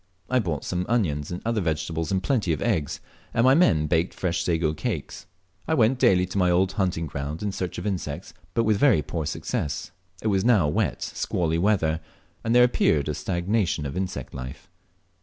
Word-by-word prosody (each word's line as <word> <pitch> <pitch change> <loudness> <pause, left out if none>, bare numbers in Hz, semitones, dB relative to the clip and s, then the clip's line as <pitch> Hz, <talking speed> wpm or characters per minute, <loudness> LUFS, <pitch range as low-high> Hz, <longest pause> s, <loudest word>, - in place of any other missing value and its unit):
I 130 - +4
bought 85 - -2
some 90 0 -2
onions 80 -12 0
and 90 - -5
other 115 -2 +1
vegetables, 80 0 -2
and 95 -1 0
plenty 110 -9 +1
of 75 - -4
eggs, 85 - -1 0.3
and 115 - +3
my 130 +1 +6
men 85 - +4
baked 80 +3 0
fresh 85 -2 -1
sago 80 -2 +1
cakes. 80 - -4 0.4
I 160 - +2
went 120 0 +3
daily 90 -5 +4
to 95 +2 -3
my 90 -1 +3
old 90 +2 +3
hunting 90 -5 -1
ground 70 +4 -5
in 105 - -1
search 90 -2 -4
of 90 - -5
insects, 90 -4 -4 0.2
but 115 - +3
with 110 -2 +2
very 110 - +4
poor 80 -4 -3
success. 75 0 -3 0.3
It 110 - +1
was 95 -2 +2
now 110 -10 +4
wet, 75 - 0
squally 85 -1 -1
weather, 85 -5 +2 0.4
and 115 +1 +1
there 125 - +8
appeared 75 - +2
a - - 0
stagnation 90 -1 -1
of 70 - -4
insect 95 0 -4
life. 65 +8 -8
90 Hz, 195 wpm, -25 LUFS, 80-105 Hz, 0.4 s, there